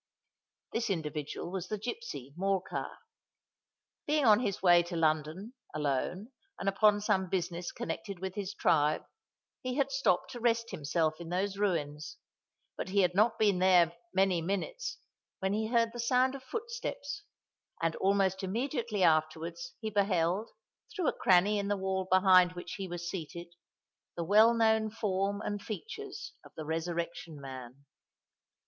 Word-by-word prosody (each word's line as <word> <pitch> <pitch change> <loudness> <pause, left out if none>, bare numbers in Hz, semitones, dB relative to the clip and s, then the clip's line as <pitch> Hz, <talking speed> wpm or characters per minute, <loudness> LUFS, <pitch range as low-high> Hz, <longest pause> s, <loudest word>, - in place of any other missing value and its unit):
This 230 -1 -1
individual 155 -2 -3
was 185 -1 -4
the 215 - -2
gipsy, 210 - -6
Morcar. 190 0 -1 1.2
Being 300 -1 +2
on 215 -2 +7
his 200 -7 -2
way 175 -2 +7
to 175 0 -6
London,—alone, 160 - -1 0.3
and - - -5
upon 205 +1 +4
some 195 -3 +1
business 175 -1 -2
connected 210 -4 -5
with 190 +1 -4
his 200 -1 -4
tribe,—he 155 - -1
had 275 -1 +1
stopped 270 -9 +1
to 245 - -7
rest 230 -1 +1
himself 155 +1 0
in 165 - -7
those 195 +2 -1
ruins: 155 - -1 0.6
but - - -5
he 200 +1 +3
had 180 -1 +2
not 215 +4 +3
been 205 -4 +3
there 180 -2 +5 0.2
many 190 -2 +2
minutes, 200 - -3 0.4
when 190 +1 -1
he 220 +1 0
heard 230 0 +2
the 240 - -7
sound 250 +2 +3
of 275 - -7
footsteps; 430 - -5 0.6
and, 165 -1 0
almost 190 -1 +2
immediately 230 +1 -1
afterwards, 165 +10 +1
he 220 -1 -3
beheld, 195 0 +1 0.5
through 365 -7 +1
a - - -2
cranny 195 +3 +4
in 200 - -2
the 205 0 0
wall 190 -1 -1
behind 185 -1 +6
which 175 - -7
he 195 -1 -4
was 175 -1 -5
seated, 170 -1 -6 0.6
the 170 - -1
well 215 +6 +6
known 220 -1 +3
form 200 -2 -1
and 205 -1 -3
features 420 - -7
of - - -16
the 155 - -6
Resurrection 165 0 -3
Man. 130 0 -9
190 Hz, 145 wpm, -31 LUFS, 170-220 Hz, 1.2 s, on